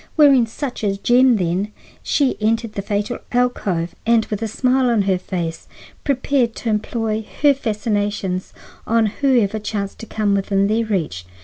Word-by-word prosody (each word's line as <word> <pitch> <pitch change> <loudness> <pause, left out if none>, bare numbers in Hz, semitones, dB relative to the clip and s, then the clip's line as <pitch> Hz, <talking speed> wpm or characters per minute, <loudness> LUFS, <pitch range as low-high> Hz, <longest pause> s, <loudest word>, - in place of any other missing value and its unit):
Wearing 275 -6 +6
such 250 +1 -5
a 195 -1 0
gem, 245 +4 +4
then, 185 +2 -1 0.3
she 280 -3 +1
entered 225 0 0
the 200 - -3
fatal 205 +3 -2
alcove, 200 -9 0
and, 230 -1 +3
with 210 0 -2
a 225 - -1
smile 255 +3 +2
on 225 -4 +2
her 190 -2 +1
face, 170 -3 -4 0.4
prepared 260 -3 +1
to 230 - -3
employ 220 0 -1 0.2
her 290 -1 +7
fascinations 205 -6 -2 0.4
on 230 0 +3
whoever 220 -2 +1
chanced 205 -2 -4
to 225 - -8
come 210 -2 0
within 195 0 +1
their 220 +3 +1
reach. 155 - -2
220 Hz, 155 wpm, -20 LUFS, 200-240 Hz, 0.4 s, her